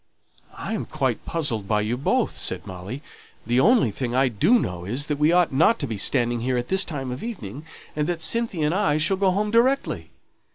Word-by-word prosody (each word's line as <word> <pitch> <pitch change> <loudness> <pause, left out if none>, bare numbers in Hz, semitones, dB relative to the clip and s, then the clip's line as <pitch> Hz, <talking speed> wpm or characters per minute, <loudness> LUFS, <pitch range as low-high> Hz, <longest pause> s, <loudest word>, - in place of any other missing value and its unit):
"I - - -4
am - - -3
quite - - -2
puzzled 125 -12 -1
by 105 0 +1
you 110 +3 -1
both," 130 - 0
said - - -3
Molly. 95 - -7 0.4
"The 120 +3 +2
only 215 - +4
thing 120 +3 -3
I 130 0 +3
do 160 - +3
know 90 - -3
is, 125 +10 -2
that 150 -1 -3
we 150 +2 +4
ought 175 -4 +3
not 165 +12 +4
to 140 - -2
be 110 -6 -4
standing 120 0 +1
here 125 +1 0
at 120 0 -3
this 190 +1 +4
time 135 -6 -5
of 125 - -6
evening, 150 - -7 0.3
and 150 0 -1
that 175 -2 -2
Cynthia 195 -2 0
and 150 - +1
I 185 -6 +2
shall 170 +5 +1
go 195 0 +3
home 205 +3 0
directly. 255 +4 +1
145 Hz, 215 wpm, -24 LUFS, 120-185 Hz, 0.4 s, only